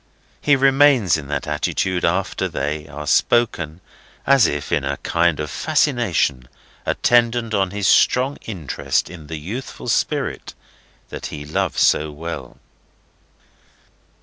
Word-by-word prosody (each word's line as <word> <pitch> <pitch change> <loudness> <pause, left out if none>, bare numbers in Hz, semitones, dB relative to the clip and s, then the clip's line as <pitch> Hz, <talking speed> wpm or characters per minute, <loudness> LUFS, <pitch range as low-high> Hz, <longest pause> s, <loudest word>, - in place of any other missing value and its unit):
He 145 - +4
remains 135 - +4
in 75 -3 -5
that 75 0 -3
attitude 90 +4 -1
after 95 +3 0
they 75 +2 -3
are 75 +1 -8
spoken, 85 -3 +1 0.4
as 140 -2 +5
if 70 -1 -4
in - - +1
a - - -2
kind 85 -2 +1
of 75 -2 -4
fascination 65 -1 0 0.4
attendant 120 -1 +2
on 95 -2 +1
his 100 +1 -3
strong 130 +3 +3
interest 70 - -2
in 80 -4 -11
the 80 - -5
youthful 105 - -6
spirit - - -1 0.5
that - - -6
he 75 -1 -8
loves 75 - -1
so 75 +1 +3
well. 80 +3 -7
85 Hz, 125 wpm, -20 LUFS, 75-115 Hz, 0.5 s, as